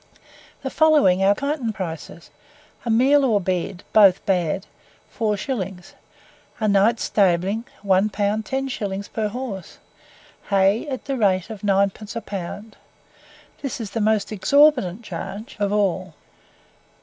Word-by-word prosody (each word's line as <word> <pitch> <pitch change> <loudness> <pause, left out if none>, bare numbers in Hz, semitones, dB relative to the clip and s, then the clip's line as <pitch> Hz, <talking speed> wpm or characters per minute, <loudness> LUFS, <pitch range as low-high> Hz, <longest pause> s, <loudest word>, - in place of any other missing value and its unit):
The - - -3
following 290 - +4
are 200 +1 +4
the - - -11
Kyneton 280 -6 -1
prices. 165 -3 -7 0.5
A - - -2
meal 265 +6 +4
or 225 -6 +3
bed 185 -1 -3
both 200 -4 +6
bad 180 -1 0 0.5
4s; 205 -4 -3 0.7
a 215 - 0
night's 205 +3 +3
stabling, 195 +3 +1 0.2
one 195 +1 +3
pound 205 +1 -1
ten 270 0 -2
shillings 200 -5 -4
per 220 -1 -2
horse; 210 -5 -6 0.7
hay 200 +5 +2
at 260 -3 -5
the 275 -1 -2
rate 190 -2 +1
of 215 -3 -8
9d. 200 +2 0
a 230 - -3
pound; 205 +3 -7 0.8
this 275 -3 -4
is 215 -3 -5
the 225 - -2
most 215 -1 +1
exorbitant 235 - +3
charge 200 - -7
of 200 -1 0
all. 185 -4 0
205 Hz, 135 wpm, -22 LUFS, 190-230 Hz, 0.8 s, both